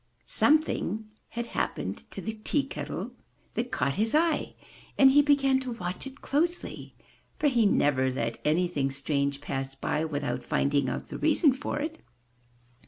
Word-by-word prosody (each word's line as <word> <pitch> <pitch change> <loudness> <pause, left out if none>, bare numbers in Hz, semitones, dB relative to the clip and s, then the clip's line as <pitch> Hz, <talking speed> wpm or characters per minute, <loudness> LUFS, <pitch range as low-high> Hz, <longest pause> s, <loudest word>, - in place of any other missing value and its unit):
Something 220 -8 +2 0.2
had 235 0 -4
happened - - -3
to - - -7
the 220 - -4
tea 290 +4 +1
kettle 275 - -5 0.4
that 245 +2 -2
caught 140 -1 0
his 225 +5 +2
eye, 320 -1 +1 0.4
and 270 -1 +8
he 290 +2 +7
began 275 -2 +3
to 255 -2 -4
watch 185 +2 -4
it 270 +1 -12
closely, 335 +5 -1 0.4
for - - -2
he 240 -6 +4
never 135 -7 +3
let 115 -3 -3
anything 155 -3 +1
strange 140 0 -1
pass 135 0 -4
by, 150 +3 -1
without 145 -2 -2
finding 140 -2 +1
out - - -5
the - - -6
reason 295 -7 +4
for 280 +2 -4
it. 315 +2 -4
220 Hz, 155 wpm, -28 LUFS, -, 0.4 s, and